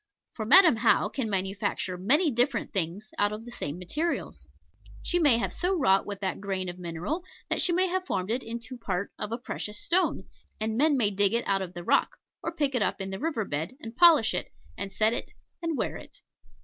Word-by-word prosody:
For 220 - -4
Madam 335 - +7
How 205 - +3
can 235 -1 -3
manufacture 195 -1 -2
many 280 - +3
different 245 +1 +1
things 195 +3 -2
out 205 0 +3
of 215 +2 -6
the 240 - -9
same 150 -8 -4
materials. 300 - -3 0.6
She 350 - 0
may 290 -8 +5
have 235 - -2
so 365 +2 0
wrought 195 - +3
with 200 -1 -6
that 190 0 -2
grain 190 -2 -2
of 175 +1 -8
mineral, 175 - -3 0.3
that - - +2
she 360 - +2
may 365 +2 +3
have 370 0 -1
formed 190 +2 -1
it 245 +3 0
into 235 +2 -7
part 200 -3 -3
of 210 - -4
a 230 - -1
precious 210 -3 -5
stone, 360 - +1 0.4
and 220 0 -1
men 290 +3 +3
may 210 -5 +2
dig 200 +2 +2
it 235 - -1
out 195 -1 +2
of 180 -1 -6
the 175 - -6
rock, - - +2 0.2
or 330 - -3
pick 290 -5 -1
it 250 - 0
up - - 0
in 195 0 -4
the 190 - -5
river 290 -8 -1
bed, 160 - -3
and 225 -4 -8
polish 320 -8 +6
it, - - -3 0.2
and 200 -1 -5
set 220 +2 +2
it, - - -4 0.3
and 330 -3 -1
wear - - -2
it. - - -14
220 Hz, 220 wpm, -28 LUFS, 195-290 Hz, 0.6 s, Madam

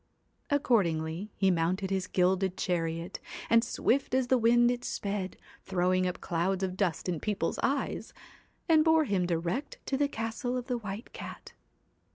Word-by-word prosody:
Accordingly 190 - +1
he 195 -1 +3
mounted 185 +3 0
his 190 -1 0
gilded 185 0 +1
chariot, 165 0 -2 0.3
and 230 0 +6
swift 255 +2 +1
as 260 -1 +1
the 260 - +5
wind 240 +1 +5
it 245 0 -3
sped, 200 -2 -3 0.3
throwing 185 0 +1
up 180 - -3
clouds 185 +3 -1
of 185 -1 -1
dust 185 -4 -1
in 175 -3 -1
people's 210 +2 -1
eyes, - - -1 0.6
and 320 -2 +6
bore 320 0 +5
him 195 -9 0
direct 175 - -2
to 270 - 0
the 285 +1 +2
castle 230 0 -3
of 250 - -4
the 250 -2 -2
White 210 +1 -7
Cat. - - -9
195 Hz, 160 wpm, -30 LUFS, 180-240 Hz, 0.6 s, and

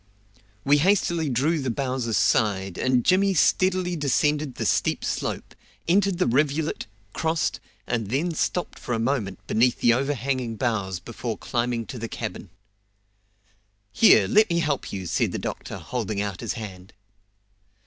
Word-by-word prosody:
We 145 +2 +4
hastily 170 -3 +2
drew 145 +7 +1
the 135 -2 -2
boughs 130 0 -2
aside, 100 -4 +1
and 125 -2 +2
Jimmy 195 +1 +3
steadily 185 +1 +2
descended 150 -1 0
the - - -3
steep - - +1
slope, - - -3 0.3
entered 195 +1 +3
the 180 - +2
rivulet, 150 +4 0 0.3
crossed, 160 0 -1 0.3
and 115 -3 -2
then 155 +8 0
stopped 175 +3 -2
for 120 - -3
a - - -2
moment 115 -6 -2
beneath 120 +2 +2
the 120 - +4
overhanging 130 -2 -1
boughs 100 -6 -1
before 115 +2 -5
climbing 120 -1 -2
to 125 - -7
the 115 0 -5
cabin. - - -6 1.4
"Here, 225 - +6
let 215 0 +4
me 170 - +1
help 150 -5 -1
you!" 95 -2 -5
said - - 0
the - - -1
doctor, - - -5
holding 110 -5 -3
out 100 -2 -3
his - - -2
hand. 95 -3 -9
130 Hz, 150 wpm, -25 LUFS, 115-160 Hz, 1.4 s, Here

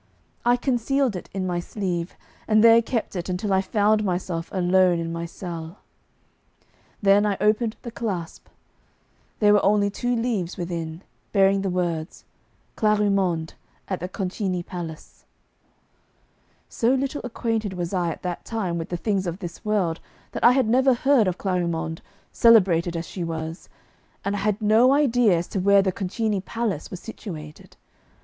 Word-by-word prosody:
I 245 +1 +4
concealed 260 -1 0
it 180 - -7
in 190 -1 -3
my 175 -1 -1
sleeve, 175 -2 -3 0.3
and 215 0 +4
there 230 0 +8
kept 230 -3 -3
it 175 0 -4
until 190 +2 -1
I 190 - +3
found 210 +2 +2
myself 175 -3 -2
alone 185 -1 +3
in 165 0 -3
my 170 0 -4
cell. 170 0 -7 1.3
Then 200 +1 +5
I 205 -2 0
opened 215 +1 +1
the 235 - -6
clasp. 195 -8 -5 0.9
There 210 -1 +5
were 205 - +4
only 205 0 +3
two 245 +4 -1
leaves 225 -7 -2
within, 170 0 -5 0.3
bearing 195 -1 +4
the 195 - -1
words, 175 -2 -3 0.5
'Clarimonde. 195 -6 +1 0.3
At 190 - -3
the 180 - -5
Concini 185 -2 -3
Palace.' 165 -3 -8 1.4
So 240 +3 +1
little 275 +2 -2
acquainted 225 -4 -2
was 175 0 -4
I 175 -2 0
at 165 - -7
that 180 -1 -4
time 190 -7 -2
with 165 - -5
the 175 - -2
things 195 0 -1
of 170 0 -3
this 175 -1 -8
world 200 -7 0 0.3
that - - -5
I 240 - +8
had 260 -3 +2
never 260 +3 +4
heard 260 -4 +3
of 180 - -1
Clarimonde, 170 -4 -2 0.3
celebrated 180 -7 +4
as 165 - -4
she 180 - -6
was, 160 0 -5 0.6
and 200 +1 0
I - - -2
had 210 +2 -1
no 225 +5 +5
idea 245 - +3
as 170 - -3
to 195 - -2
where 200 +1 +5
the 190 - +1
Concini 205 +2 -2
Palace 220 -8 -3
was 185 - -7
situated. 160 -9 -9
195 Hz, 160 wpm, -24 LUFS, 175-220 Hz, 1.4 s, there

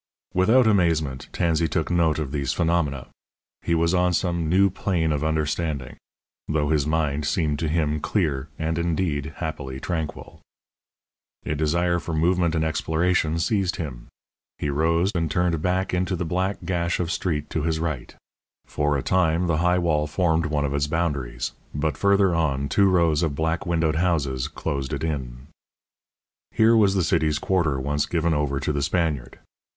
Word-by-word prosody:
Without 115 +8 +4
amazement 80 -10 +1
Tansey 85 -1 +1
took 80 0 -2
note 85 -3 +2
of 75 -4 -3
these 70 -2 -1
phenomena. 80 -6 0 0.5
He 85 - 0
was 85 +1 +2
on 90 0 +2
some 85 -3 0
new 95 +2 +4
plane 85 -4 0
of 75 0 -1
understanding, 75 -3 -1 0.5
though 75 -2 0
his 75 -2 +1
mind 75 -2 0
seemed 75 -2 0
to 80 - -1
him 75 -1 0
clear 75 -6 -1
and, 80 +1 -1
indeed, 80 -3 -1
happily 70 -5 -5
tranquil. 80 -1 -5 1.0
A - - -1
desire 85 +4 +1
for 80 -1 -4
movement 85 +1 +2
and 80 0 +1
exploration 80 +1 0
seized 95 +1 0
him: 65 -8 -6 0.5
he 75 - -2
rose 85 +6 +1
and 80 -3 -1
turned 90 +2 +1 0.4
into 90 +1 0
the 90 - -3
black 95 +4 -1
gash 85 -1 -1
of 85 -1 -1
street 80 -4 -2
to 80 - -1
his 80 +1 -1
right. 75 -7 -4 0.5
For 75 -1 0
a 65 - -3
time 90 -2 +2
the 85 -3 +1
high 90 +2 +2
wall 80 -4 +1
formed 80 +1 +1
one 75 -2 0
of 70 - -2
its 70 0 0
boundaries; 70 -7 -2 0.2
but 75 +1 -1
further 100 -2 +3
on, 70 -4 0
two 100 -1 +4
rows 85 -4 +3
of 80 -4 -1
black 80 +5 -1
windowed 80 -2 +1
houses 75 -7 0
closed 70 -3 -4
it - - -3
in. 65 -5 -4 1.0
Here 115 +1 +4
was 100 -3 +4
the 95 - +2
city's 75 -1 +1
quarter 80 -7 0
once 70 +2 -1
given 85 -1 0
over 75 -2 0
to 75 - -1
the 70 - -1
Spaniard. 80 -5 -1
80 Hz, 165 wpm, -24 LUFS, 75-85 Hz, 1.0 s, Without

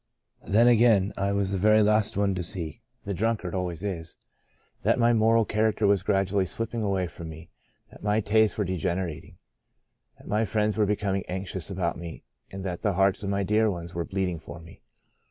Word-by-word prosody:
"Then 110 +4 +4
again 115 -5 +4
I 100 +1 0
was 100 -1 0
the 95 - -1
very 110 +2 +5
last 105 0 +2
one 100 -1 +2
to 90 - -3
see 85 +3 -4 0.2
(the 100 - -2
drunkard 105 -2 -1
always 90 -2 -3
is) 85 -5 -5 0.6
that - - +2
my 120 0 +4
moral 115 0 +4
character 110 0 +1
was 100 -1 +3
gradually 95 -1 +1
slipping 115 +3 -3
away 100 -3 0
from 85 -1 -8
me; 80 +2 -11 0.4
that - - -15
my 105 +1 +1
tastes 110 +1 +2
were 105 - 0
degenerating; 85 -2 -3 0.8
that - - -18
my 105 +2 +1
friends 105 0 0
were 105 -2 +2
becoming 100 -2 -1
anxious 95 -1 -4
about 95 -2 -2
me 85 -2 -8 0.3
and 95 0 -7
that 90 -2 -4
the 100 - +1
hearts 95 +1 +2
of 100 - -3
my 100 0 0
dear 105 +3 +2
ones 85 -3 -5
were 85 - -2
bleeding 90 -2 -2
for 85 - -10
me. 85 0 -15
100 Hz, 190 wpm, -26 LUFS, 90-105 Hz, 0.8 s, very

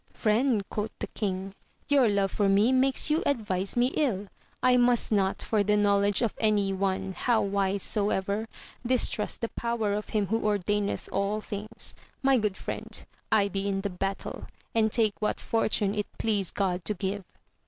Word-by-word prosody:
Friend, 220 -1 +1
quoth 210 +1 -3
the - - -3
king, 195 -2 -4 0.3
your 275 -5 +4
love 200 -2 +1
for 205 -2 +1
me 205 +5 +4
makes 265 +3 +2
you 315 +3 +2
advise 205 -7 0
me 245 +1 +4
ill. 210 -10 0 0.3
1 250 -1 +5
must 245 -1 +2
not, 195 -2 +1
for 215 -2 +1
the 210 +1 +2
knowledge 205 +1 +3
of 225 - 0
any 205 -3 +2
one, 190 0 -1
how 235 +4 +1
wise 200 0 0
soever, 205 +1 0 0.4
distrust 240 -3 +1
the 230 - -1
'power 235 -3 -1
of 210 +1 -3
him 210 -2 +1
who 225 +4 0
ordaineth 205 0 0
ail 200 +2 0
things. 210 +1 -3 0.3
My 270 -1 +4
good 210 -3 -1
friend, - - -5 0.3
I 210 -2 +4
be 195 0 -3
in 195 -1 -1
the 200 0 -3
battle, 195 +2 -4 0.3
and 220 -1 +2
take 220 -3 +3
what 210 - -1
fortune 215 -3 +1
it 210 -1 -2
please 205 -5 0
God 185 -3 -1
to 210 - -1
give. 195 +1 -3
210 Hz, 175 wpm, -28 LUFS, 195-225 Hz, 0.4 s, 1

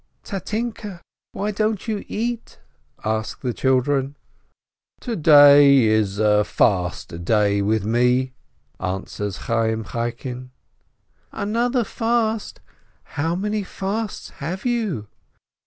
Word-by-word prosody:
"Tatinke, 210 -1 -4 0.3
why 210 +1 -2
don't 215 +1 -1
you 215 -2 -2
eat?" 235 +1 -4 0.5
ask 110 0 -2
the 125 -3 -2
children. 135 +2 +1 0.9
"To 240 -3 -3
day 145 - +7
is 110 -3 +2
a 105 0 +3
fast 90 -4 0
day 100 +1 +2
with 105 0 0
me," 125 +3 +2 0.5
answers 95 +1 -4
Chayyim 110 -1 0
Chaikin. 120 +2 -4 0.8
"Another 235 +4 0
fast? 225 0 -1 0.5
How 160 +3 -1
many 210 +3 -1
fasts 200 +2 -4
have 180 - -4
you?" 220 - -1
140 Hz, 100 wpm, -22 LUFS, -, 0.9 s, day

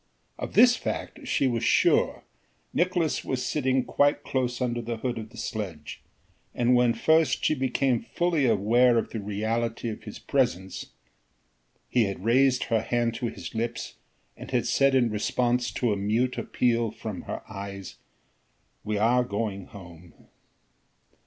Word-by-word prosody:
Of - - -6
this 245 0 +7
fact 280 +2 -5
she 140 - +1
was 120 -3 0
sure, - - +3 0.5
Nicolaes 175 -3 +1
was 130 -1 -2
sitting 130 -3 +1
quite 145 +1 +2
close 125 -2 -1
under 120 -2 -1
the 115 0 -4
hood 120 0 -3
of 110 0 -8
the - - -15
sledge 90 -9 -5 0.5
and 120 +1 +3
when 125 -1 +4
first 160 +7 +2
she - - +3
became 130 -2 +1
fully 170 -6 0
aware 115 +3 +4
of 115 - -1
the 115 - -4
reality 110 +3 -2
of 110 - -6
his 105 - -8
presence, 95 -9 -1 1.0
he 120 -3 +2
had 100 0 -5
raised 130 +2 +4
her 115 -2 +1
hand 120 -1 0
to 115 +1 -3
his - - -7
lips 115 0 -3 0.4
and - - -10
had - - 0
said 135 -1 +3
in 120 -3 +3
response 120 +3 0
to 120 -4 +1
a - - -2
mute 110 +6 0
appeal 115 -2 0
from 110 -2 -6
her - - -4
eyes: 100 -2 -8 0.9
"We 105 0 -2
are 120 +4 +3
going 100 -4 -3
home." 85 -4 -14
120 Hz, 150 wpm, -26 LUFS, 105-130 Hz, 1.0 s, this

